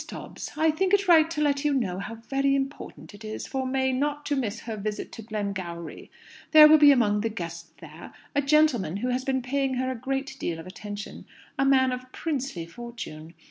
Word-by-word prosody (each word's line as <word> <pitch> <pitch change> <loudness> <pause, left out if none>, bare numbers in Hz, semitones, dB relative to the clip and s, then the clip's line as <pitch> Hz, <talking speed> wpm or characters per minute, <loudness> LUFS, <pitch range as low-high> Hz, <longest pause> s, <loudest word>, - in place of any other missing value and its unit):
DOBBS, - - -8
"I 315 0 +4
think 380 +5 +2
it 400 -1 -1
right 325 -2 +6
to 315 -2 -3
let 285 -1 +1
you 295 -1 +2
know 190 -8 -1
how 230 +3 -6
very 275 +4 0
important 275 -4 -5
it 205 +2 -13
is 215 0 -5
for 265 -1 -3
May 265 0 +1
not 290 +3 -1
to 290 - 0
miss 230 -4 -2
her 225 -2 -5
visit 210 0 -4
to 225 - -9
Glengowrie. 195 -6 -5 0.4
There 305 -1 +11
will 310 0 +7
be 290 -1 +8
among 210 -6 +3
the 225 - -1
guests 170 -5 -7
there - - -11 0.2
a 285 - +2
gentleman 275 - +2
who 250 +5 -2
has 250 +1 -1
been 260 -1 -1
paying 270 0 -1
her 260 +1 -1
a - - -4
good 270 +3 -3
deal 165 - -2
of 165 - -9
attention 205 +2 -8 0.3
a 270 - +3
man 260 -1 +4
of 255 0 -6
princely 270 - -3
fortune. 170 -6 -9
255 Hz, 210 wpm, -26 LUFS, 210-280 Hz, 0.4 s, There